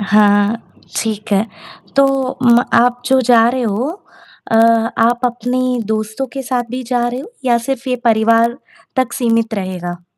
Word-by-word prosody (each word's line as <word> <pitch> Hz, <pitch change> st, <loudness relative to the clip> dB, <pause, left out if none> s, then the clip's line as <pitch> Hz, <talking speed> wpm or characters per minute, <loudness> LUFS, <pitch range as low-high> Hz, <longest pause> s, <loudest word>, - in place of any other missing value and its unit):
हाँ, 205 Hz, +1 st, +3 dB, 0.4 s
ठीक 215 Hz, -1 st, -4 dB
है। 200 Hz, +2 st, +2 dB, 0.5 s
तो 275 Hz, 0 st, +6 dB, 0.4 s
म 235 Hz, -1 st, +6 dB, 0.2 s
आप 245 Hz, +1 st, +3 dB
जो 265 Hz, -1 st, +3 dB
जा 235 Hz, -2 st, +4 dB
रहे 255 Hz, 0 st, -2 dB
हो, 225 Hz, +4 st, -1 dB, 0.6 s
अ, 225 Hz, -, +3 dB, 0.4 s
आप 240 Hz, +1 st, +2 dB
अपने 245 Hz, +1 st, -1 dB, 0.3 s
दोस्तों 215 Hz, +4 st, -2 dB
के 270 Hz, -1 st, -5 dB
साथ 250 Hz, -1 st, -2 dB
भी 255 Hz, +1 st, -4 dB
जा 240 Hz, -1 st, +1 dB
रहे 245 Hz, +2 st, -4 dB
हो 415 Hz, +12 st, -11 dB
या 240 Hz, -2 st, +3 dB
सिर्फ़ 270 Hz, -1 st, -3 dB
ये 250 Hz, -, 0 dB
परिवार 230 Hz, +1 st, +3 dB, 0.4 s
तक 255 Hz, -2 st, 0 dB
सीमित 230 Hz, -2 st, 0 dB
रहेगा? 180 Hz, -3 st, -5 dB
235 Hz, 160 wpm, -16 LUFS, 215-250 Hz, 0.6 s, तो